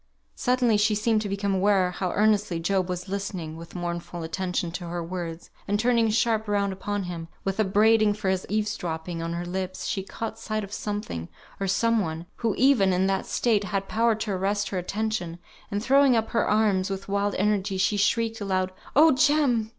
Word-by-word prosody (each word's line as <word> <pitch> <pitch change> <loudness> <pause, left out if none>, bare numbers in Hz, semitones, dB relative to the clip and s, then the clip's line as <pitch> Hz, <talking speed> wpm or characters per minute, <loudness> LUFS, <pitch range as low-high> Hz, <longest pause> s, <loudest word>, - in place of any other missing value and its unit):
Suddenly 250 -3 +2
she 210 +1 +2
seemed 215 +1 +2
to 205 - -4
become 200 0 -1
aware 190 -1 +3
how 180 0 -2
earnestly 210 -4 +2
Job 185 +2 0
was 180 +1 -4
listening 190 -5 -4
(with 165 +2 -11
mournful 175 -1 -4
attention) 180 +1 -2
to 175 0 -6
her 170 0 -3
words, 170 -1 -6 0.2
and 205 +1 +1
turning 235 -1 +3
sharp 220 0 +1
round 200 -1 +1
upon 205 +1 -3
him, 170 -2 -6 0.2
with 195 +2 -2
upbraiding 215 +1 +4
for 210 -2 -4
his 190 -1 -1
eaves 215 +1 0
dropping 165 0 -4
on 165 0 -3
her 170 +1 -3
lips, 185 +1 -4
she 195 - -1
caught 225 +3 -6
sight 215 -1 -3
of 200 0 -8
something, 205 - -4 0.3
or 195 - -1
some 230 +4 +2
one, 160 -3 -3
who, 225 -3 0
even 245 -8 +4
in 185 +1 +2
that 195 0 0
state, 215 -4 +1
had 195 +1 -2
power 230 0 +2
to 220 -1 -3
arrest 195 +2 0
her 190 - -2
attention, 195 -2 -3 0.3
and 205 +1 -2
throwing 275 0 +5
up 225 -1 0
her 230 - +1
arms 205 -3 +2
with 195 0 -5
wild 200 0 0
energy, 200 -1 0
she 195 +2 +2
shrieked 225 +2 +1
aloud, 185 -2 0 0.2
"Oh, 315 +3 +7
Jem! 260 -5 +3
200 Hz, 195 wpm, -26 LUFS, 185-220 Hz, 0.3 s, Oh